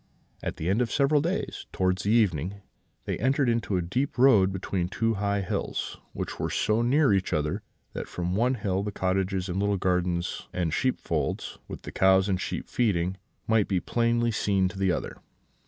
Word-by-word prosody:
"At - - -4
the 80 - -3
end 100 +6 +2
of 120 - 0
several 140 +1 +3
days, 175 +6 -3
towards 95 0 0
the 100 - 0
evening, 100 -4 +1 0.4
they - - -2
entered 135 +3 +2
into 115 -5 +1
a 90 - 0
deep 125 +13 -2
road 110 -7 +6
between 95 -1 -2
two 115 +3 0
high 100 0 0
hills, 95 - -3
which - - -5
were - - -1
so 110 +2 +1
near 135 +1 +4
each 95 -1 0
other 75 0 0 0.3
that - - -5
from 90 0 -3
one 125 +5 +2
hill 95 -4 -1
the 105 +1 -3
cottages 95 0 -1
and 90 +1 -2
little 100 0 +1
gardens 90 -1 -1
and 85 -3 -1
sheepfolds, 130 - -1
with - - -8
the - - -7
cows 95 0 +4
and 95 -2 0
sheep - - -4
feeding, 95 -6 0 0.3
might 110 -2 +3
be 95 -3 +1
plainly 120 +3 +1
seen 100 -4 +1
on 95 - -9
the 95 -2 +2
other. - - -3
100 Hz, 190 wpm, -27 LUFS, 95-115 Hz, 0.4 s, road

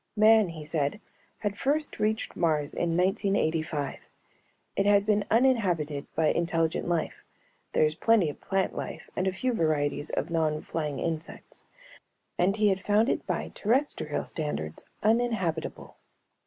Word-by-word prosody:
Man, 215 -2 +6
he 155 -2 -8
said, 150 +3 -1 0.4
had 205 -1 -3
first 295 +2 0
reached 215 +1 -1
Mars 155 -3 +1
in 170 -1 0
1985. 165 -6 0 0.8
It 200 - +1
had 200 -1 +5
been 210 -1 +2
uninhabited 185 - +2
by 155 -1 +3
intelligent 165 -1 0
life 170 -2 -2 0.5
(there - - +4
is 155 - +1
plenty 210 +1 +3
of 150 - -6
plant 195 0 -1
life - - -6
and 185 - 0
a - - +2
few 250 +7 -1
varieties 145 -5 0
of - - -2
non 155 -2 0
flying 150 -4 -3
insects) 165 -1 -5 0.7
and 195 +4 +2
he 210 -1 +4
had 190 -1 +1
found 210 +5 +2
it - - -1
by - - -2
terrestrial 230 - 0
standards 80 - -4 0.2
uninhabitable. 215 -8 0
175 Hz, 140 wpm, -28 LUFS, 155-210 Hz, 0.8 s, Man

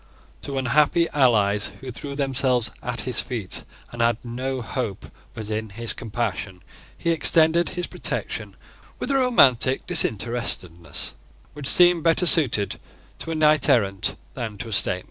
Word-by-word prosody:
To 140 -1 -5
unhappy 150 +6 +2
allies 105 -7 +2
who 130 -1 -8
threw 140 +3 -7
themselves 130 -3 0
at 125 -1 -4
his 125 -2 0
feet, 110 -8 -4 0.3
and 120 - -5
had 115 -1 +2
no 125 +1 -4
hope 115 -5 -4 0.3
but 110 -1 -6
in 110 0 -3
his 115 +3 -1
compassion, 105 -5 -4 0.3
he 170 - -1
extended 165 +1 +3
his 175 - -1
protection - - -5 0.4
with - - -4
a - - +1
romantic 135 - +3
disinterestedness, 105 - -1 0.4
which 145 -2 -6
seemed 175 -1 +5
better 165 +2 +2
suited 130 - +5 0.4
to - - -6
a 165 - -2
knight 155 -2 +3
errant 100 -5 +1 0.2
than 110 -4 -6
to 115 - -6
a - - -4
statesman. 95 -2 +1
125 Hz, 145 wpm, -23 LUFS, 110-150 Hz, 0.4 s, seemed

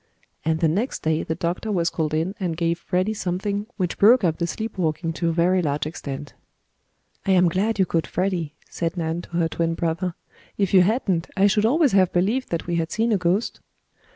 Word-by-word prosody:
And 160 0 0
the 165 - +4
next 205 - -1
day 160 0 +1
the 160 - -3
doctor 175 +6 -2
was 175 -4 +1
called 155 -2 -1
in 165 +5 0
and 175 -4 -2
gave 170 0 0
Freddie 185 +4 0
something 200 +2 -2
which 180 -4 -2
broke 230 +3 +6
up 165 -3 +1
the 170 - 0
sleep 220 +2 -5
walking 165 0 -1
to 170 +1 -1
a - - +2
very 175 +3 +2
large 145 -2 -1
extent. 145 -2 -6 0.9
"I 195 - +4
am 180 -1 +5
glad 200 +6 0
you 190 - +3
caught 165 -2 -1
Freddie," 175 -4 -2
said 170 +1 -3
Nan, 165 0 -2
to - - -14
her 170 -1 +2
twin 165 0 -1
brother. 170 +1 -2 0.4
"If 200 -2 0
you 185 - +8
hadn't, 185 -4 +1
I 195 - +5
should 210 +2 +3
always 290 +2 +3
have 190 -2 +4
believed 215 +9 0
that 170 - -2
we 175 -1 -1
had 165 -1 -2
seen 230 +1 +1
a 210 - +3
ghost." 180 +5 0
175 Hz, 210 wpm, -23 LUFS, 165-195 Hz, 0.9 s, you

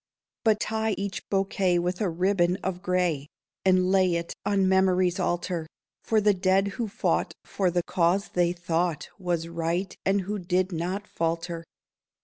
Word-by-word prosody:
But 220 -3 +3
tie 220 0 0
each 200 0 -5
bouquet 195 -2 +1
with 180 +2 -1
a 200 - +1
ribbon 180 +1 +2
of 185 -1 -3
gray 180 -6 0 0.4
And 185 -1 +3
lay 185 -2 +3
it 170 0 -3
on 195 -2 +2
memory's 185 -1 +3
altar, 175 -2 -1 0.4
For 220 - +2
the 210 0 +4
dead 190 +1 +2
who 230 +3 -3
fought 220 +5 -1
for 190 -2 0
the 175 0 0
cause 180 +4 +1
they 175 -1 +2
thought 175 -2 -1
Was 175 -3 -1
right, 170 +3 -2
and 195 +1 +2
who 205 +3 -3
did 185 +1 0
not 180 +5 -3
falter. 165 0 -2
185 Hz, 155 wpm, -27 LUFS, 175-195 Hz, 0.4 s, the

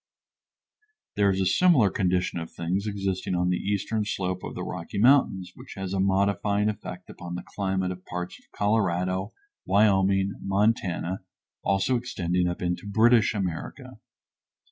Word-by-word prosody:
There 100 -1 +3
is 95 0 +1
a 95 - +1
similar 135 - +4
condition 90 -2 0
of 80 - -6
things 90 +5 -2
existing 95 -3 -2
on 90 0 +1
the 90 - +1
eastern 105 +2 -1
slope 95 -3 -2
of - - -6
the - - -4
Rocky 90 +2 -6
Mountains 105 -6 +4
which - - -12
has 95 -1 -4
a 95 - 0
modifying 100 +2 +2
effect 105 - -7
upon 90 0 -7
the 90 - -5
climate 95 -2 -2
of 90 0 -8
parts 90 -1 -6
of - - -30
Colorado, 95 -2 0 0.4
Wyoming, 95 -1 +3
Montana, 95 -3 0 0.4
also 100 +6 +1
extending 90 -7 -1
up 85 0 -3
into 90 +3 -2
British 110 +1 +4
America. 90 -5 -5
95 Hz, 145 wpm, -26 LUFS, 90-105 Hz, 0.4 s, similar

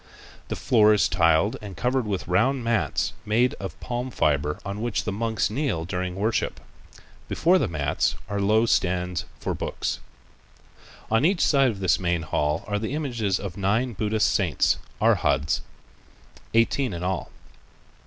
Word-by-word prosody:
The - - -3
floor 110 -3 +4
is 105 - +3
tiled 85 +3 +3
and 100 -3 -9
covered 125 -1 0
with 100 -3 -3
round 125 +8 +2
mats 110 - 0
made 120 +4 +2
of 95 - -7
palm 125 +1 -3
fiber 75 - 0
on 100 +1 -4
which 120 -2 -1
the 110 - -2
monks 110 -1 -1
kneel 120 - -1
during 90 0 -3
worship. 110 +4 -1 0.7
Before 180 +3 +3
the - - +1
mats 75 -5 0
are 100 0 -2
low 110 +3 +3
stands 90 -4 0
for - - -2
books. - - -3 1.1
On 115 +4 +3
each 180 +3 +2
side 135 -3 +4
of 100 -4 -5
this 95 - +3
main 85 -2 0
hall 75 0 -1
are 105 -1 -1
the 110 +6 -3
images 120 -10 -1
of 95 -2 -6
nine 110 +6 0
Buddhist 105 +1 +1
saints 85 - +2 0.2
(arhats), 70 +2 +2 0.9
eighteen 115 +1 +2
in 85 0 -5
all. 95 0 -2
105 Hz, 155 wpm, -25 LUFS, 90-115 Hz, 1.1 s, floor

